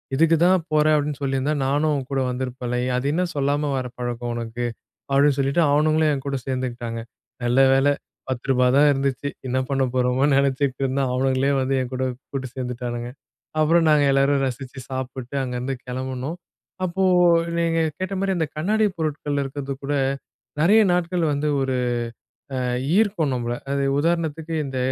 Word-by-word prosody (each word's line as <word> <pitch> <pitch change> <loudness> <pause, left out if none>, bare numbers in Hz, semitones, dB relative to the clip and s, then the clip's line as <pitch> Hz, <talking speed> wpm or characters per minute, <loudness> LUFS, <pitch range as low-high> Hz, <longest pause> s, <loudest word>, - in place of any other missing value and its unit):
இதுக்கு 165 +3 +4
தான் 185 -1 +4
போறேன் 155 0 +4
அப்டின்னு 145 -1 -1
சொல்லியிருந்தா, 135 +2 0
நானும் 150 +3 +1
உன்கூட 135 +1 -3
வந்திருப்பேன்ல? 125 -1 -3
எ - - -1
அது 125 - -3
என்ன 180 +2 +1
சொல்லாம 145 +1 0
வர 130 - -2
பழக்கம் 120 -1 -3
உனக்கு? 120 +1 -4 0.5
அப்டின்னு 140 0 +4
சொல்லிட்டு 140 +5 +2
அவனுங்களும் 155 +1 +3
என்கூட 140 0 -3
சேர்ந்துக்கிட்டாங்க. 120 -3 -3 0.4
நல்ல 120 +2 +2
வேள 135 +1 +3 0.4
ரூ.10 125 0 +1
தான் 150 - +6
இருந்துச்சு! 135 0 -1 0.2
என்ன 130 +1 -1
பண்ண 135 -1 +1
போறோமோன்னு 130 +3 +2
நெனைச்சிட்டு 140 -1 0
இருந்தேன், 135 0 0
அவனுங்களே 130 +1 +1
வந்து 135 +1 0
என் 130 0 -5
கூட 130 0 -1 0.3
கூட்டு 130 -2 -4
சேர்ந்துட்டானுங்க 120 -1 -4 0.5
அப்புறம் 165 +2 +4
நாங்க 150 -1 +5
எல்லாரும் 135 0 +3
ரசிச்சு 130 +1 -5
சாப்பிட்டு 130 0 -5
அங்கருந்து 125 +1 -3
கிளம்புனோம். 130 +4 -4 0.5
அப்போ 185 +1 -1 0.5
நீங்க 165 -1 +1 0.2
கேட்ட 185 +1 -3
மாரி, 195 0 0
அந்த 160 - 0
கண்ணாடிப் 210 +5 +1
பொருட்கள் 150 -2 -2
இருக்கறது 135 0 -5
கூட 145 - -1 0.7
நறைய 210 +7 +6
நாட்கள் 175 0 0
வந்து 145 +2 -1
ஒரு, 135 -1 0 0.8
அ - - -1 0.4
ஈர்க்கும் 200 -9 +2
நம்பள, 120 -1 -2 0.2
அது 140 0 0 0.2
உதாரணத்துக்கு 165 0 -1
இந்த 130 -1 -4
135 Hz, 150 wpm, -23 LUFS, 130-155 Hz, 0.8 s, தான்